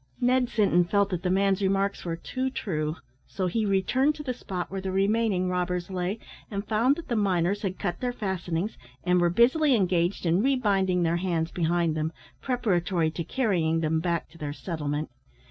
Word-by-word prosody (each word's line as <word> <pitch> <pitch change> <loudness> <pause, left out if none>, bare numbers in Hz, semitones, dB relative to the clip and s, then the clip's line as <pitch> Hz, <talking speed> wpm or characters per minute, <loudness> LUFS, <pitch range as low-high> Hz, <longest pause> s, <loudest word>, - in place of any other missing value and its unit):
Ned 250 0 +2
Sinton 195 -5 +3
felt 200 +2 +1
that 180 -2 -2
the 180 - -1
man's 195 +1 +2
remarks 195 +1 0
were 170 -1 -2
too 255 +10 -3
true, 155 -10 -2 0.3
so 190 - -3
he 215 +4 0
returned 255 +10 +2
to 300 - -7
the 255 -3 -2
spot 185 -8 -5
where 195 0 -3
the 190 0 -3
remaining 195 -1 +1
robbers 180 0 -1
lay, 185 +3 -2 0.3
and 200 -1 -4
found 235 +6 +3
that 335 - -8
the 240 - -1
miners 195 -2 +1
had 190 -2 -3
cut 175 -4 -3
their 250 -1 -1
fastenings, 190 -3 -3 0.2
and 180 0 +3
were 175 - +4
busily 260 - +4
engaged 180 -2 +1
in 170 +3 +3
rebinding 200 -9 +2
their 170 +1 +2
hands 170 -2 -1
behind 170 -2 +1
them, 155 +1 -1 0.3
preparatory 180 -10 0
to 170 - -4
carrying 170 -6 +1
them 160 0 +1
back 170 0 -1
to 165 - -17
their 145 -1 -4
settlement. 150 -2 -3
190 Hz, 185 wpm, -27 LUFS, 170-215 Hz, 0.3 s, were